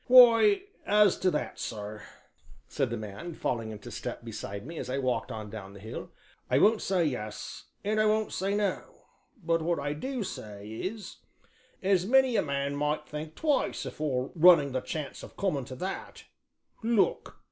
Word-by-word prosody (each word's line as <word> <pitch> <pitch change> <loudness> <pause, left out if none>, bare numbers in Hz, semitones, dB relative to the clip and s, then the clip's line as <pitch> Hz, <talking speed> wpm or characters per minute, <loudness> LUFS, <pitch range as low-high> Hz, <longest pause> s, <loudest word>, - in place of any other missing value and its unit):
"Why, 255 - +8 0.2
as 210 -2 +5
to 185 - +3
that, 150 - -3
sir," 105 -1 -5 0.7
said - - -1
the - - -2
man, 110 - -7
falling 115 -6 -2
into 110 +2 -8
step 110 +2 -5
beside 105 -2 -6
me 165 +2 -6
as - - -5
I 130 - -1
walked 130 -2 -1
on 110 -2 -6
down 100 -3 -8
the - - -10
hill, 110 +3 -7 0.4
"I 125 - +4
won't 215 +8 +5
say 185 -3 +2
yes 110 -7 -4 0.2
and 215 +1 +2
I 215 - +4
won't 215 0 +1
say 195 +2 0
no, 205 -2 -2 0.4
but 165 0 +2
what 170 +1 +1
I 145 +1 -1
do 255 - -3
say 105 - -7
is 190 - -5 0.7
as 190 -1 +3
many 265 0 +5
a - - +4
man 140 -1 -1
might 150 +1 -1
think 155 +1 -6
twice 295 -4 0
afore 130 -4 -2
running 165 -5 +7
the 130 0 -1
chance 150 0 -5
of - - -12
coming 150 -10 0
to 130 0 -8
that 185 +8 -5 0.6
look!" 225 -2 +1
155 Hz, 175 wpm, -29 LUFS, 120-200 Hz, 0.7 s, Why